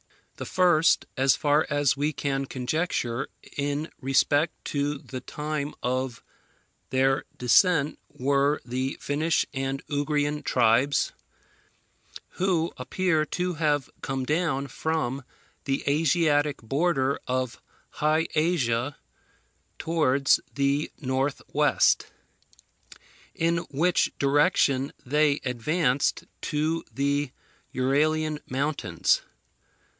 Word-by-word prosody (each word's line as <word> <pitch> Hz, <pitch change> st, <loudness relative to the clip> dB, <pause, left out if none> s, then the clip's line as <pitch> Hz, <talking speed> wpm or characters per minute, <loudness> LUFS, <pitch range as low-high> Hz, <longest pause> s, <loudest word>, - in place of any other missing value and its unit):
The -, -, -5 dB
first, 175 Hz, -4 st, +3 dB
as 135 Hz, 0 st, +4 dB
far 150 Hz, 0 st, +2 dB
as 145 Hz, -3 st, +2 dB
we 145 Hz, +2 st, 0 dB
can 135 Hz, -2 st, -2 dB
conjecture, 130 Hz, -2 st, -2 dB, 0.3 s
in 145 Hz, +2 st, -2 dB
respect 145 Hz, +4 st, +1 dB
to 145 Hz, 0 st, -1 dB
the 130 Hz, -2 st, -8 dB
time 150 Hz, +1 st, -4 dB
of 130 Hz, -1 st, -2 dB, 0.7 s
their 135 Hz, +1 st, +2 dB
descent 150 Hz, +4 st, +3 dB
were 140 Hz, +2 st, +1 dB
the 130 Hz, +2 st, -2 dB
Finnish 155 Hz, +3 st, 0 dB
and 135 Hz, 0 st, -3 dB
Ugrian 145 Hz, 0 st, 0 dB
tribes, 125 Hz, +3 st, +2 dB, 1.2 s
who 175 Hz, -3 st, 0 dB
appear 160 Hz, +4 st, 0 dB
to 180 Hz, 0 st, -2 dB
have 150 Hz, -3 st, 0 dB
come 135 Hz, -1 st, -3 dB
down 150 Hz, -2 st, 0 dB
from 140 Hz, 0 st, -2 dB, 0.4 s
the 135 Hz, -1 st, -1 dB
Asiatic 150 Hz, -2 st, +2 dB
border 140 Hz, +1 st, +1 dB
of 130 Hz, -1 st, -2 dB, 0.3 s
High 155 Hz, +2 st, +1 dB
Asia 145 Hz, -5 st, 0 dB, 0.8 s
towards 140 Hz, -5 st, +2 dB, 0.2 s
the 140 Hz, +2 st, +1 dB
north 135 Hz, 0 st, -1 dB
west, -, -, +3 dB, 1.3 s
in 165 Hz, +1 st, +1 dB
which 165 Hz, +6 st, +2 dB
direction 140 Hz, -1 st, +2 dB
they 150 Hz, +2 st, +2 dB
advanced 130 Hz, +3 st, 0 dB, 0.3 s
to 155 Hz, +2 st, 0 dB
the 140 Hz, 0 st, 0 dB, 0.5 s
Uralian 150 Hz, +4 st, +1 dB
mountains. 135 Hz, -, 0 dB
145 Hz, 95 wpm, -26 LUFS, 135-155 Hz, 1.3 s, as